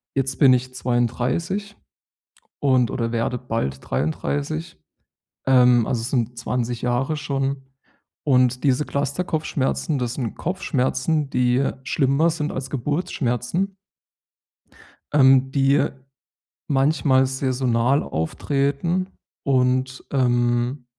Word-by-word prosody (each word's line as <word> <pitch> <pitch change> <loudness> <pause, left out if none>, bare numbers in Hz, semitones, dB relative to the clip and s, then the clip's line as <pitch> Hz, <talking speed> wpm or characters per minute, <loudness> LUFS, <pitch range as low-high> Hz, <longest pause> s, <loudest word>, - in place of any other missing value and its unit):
Jetzt 135 -1 -1
bin 135 -3 +7
ich 130 0 -1
32, 130 - -1 0.8
und 130 -4 +3
oder 115 -2 -2
werde 120 +2 -1
bald 115 - -3
33. 145 - -2 0.7
Ähm, 125 -3 +5
also, 120 -3 -1
es 115 - -4
sind 120 -2 -1
20 120 -1 -2
Jahre 125 +5 0
schon. 140 -1 -2 0.6
Und 125 -3 +3
diese 135 +2 +2
Clusterkopfschmerzen, 145 0 -1
das 120 0 -2
sind 120 -5 -3
Kopfschmerzen, 150 -3 -1
die 125 +1 +2
schlimmer 140 +5 +2
sind 150 -2 -3
als 130 0 -5
Geburtsschmerzen 145 - -2 1.4
ähm, 135 -2 +5
die 140 +1 +3 0.9
manchmal 135 -1 +3
saisonal 130 0 +1
auftreten 140 - -1 0.4
und, 130 -1 +1
ähm 120 0 +1
130 Hz, 95 wpm, -22 LUFS, 125-145 Hz, 1.4 s, bin